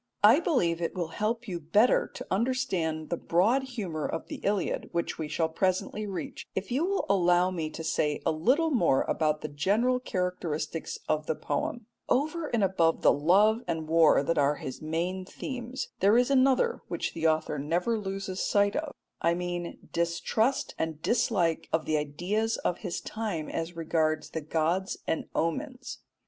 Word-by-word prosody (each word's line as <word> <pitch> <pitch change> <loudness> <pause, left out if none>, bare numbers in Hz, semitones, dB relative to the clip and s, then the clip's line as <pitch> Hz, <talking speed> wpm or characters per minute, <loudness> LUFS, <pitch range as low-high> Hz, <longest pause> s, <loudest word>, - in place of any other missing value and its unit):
I 225 +8 +8
believe 175 - +1
it 170 - -2
will 175 -3 -2
help 225 +6 -2
you 175 -3 -3
better 205 +10 +3
to - - -6
understand 190 -9 -1
the 170 - 0
broad 205 +13 +2
humour 205 - -4
of 165 - -5
the - - -5
Iliad, 200 -2 -1
which 170 -1 -2
we 155 - -2
shall 160 +2 0
presently 185 +5 -1
reach, 195 -2 -6
if 190 +2 -3
you 270 +6 +1
will 395 0 0
allow 180 -1 +3
me 165 -4 -3
to 160 - -7
say 150 -2 0
a - - +3
little 260 - +2
more 170 - +3
about 155 -1 0
the - - -3
general 205 - +1
characteristics 180 -7 -3
of 155 0 0
the 160 - 0
poem. 210 +12 -3 0.2
Over 310 +4 +1
and 230 -6 +1
above 170 -4 +2
the - - +6
love 200 +9 +4
and 160 -2 -2
war 160 -3 +5
that 165 +2 +1
are 145 +1 +3
his 130 - -7
main 170 +4 -2
themes, 250 +5 -5
there 205 +4 +5
is 250 +2 +3
another 275 - +3
which - - -3
the 165 0 +1
author 155 -2 0
never 175 +10 0
loses 195 -1 -4
sight 205 0 +2
of 300 -1 -3 0.3
I 170 0 +3
mean 175 -1 -5
distrust 170 +9 0
and 160 -2 -2
dislike 185 -8 +1
of 160 -1 +1
the 155 - +1
ideas 180 +10 -1
of 175 - -2
his 185 -5 -4
time 205 -8 -4
as 165 +1 -4
regards 160 -1 0
the 160 - -3
gods 165 +5 0
and 160 - -1
omens. 260 - -2
180 Hz, 175 wpm, -28 LUFS, 160-225 Hz, 0.3 s, I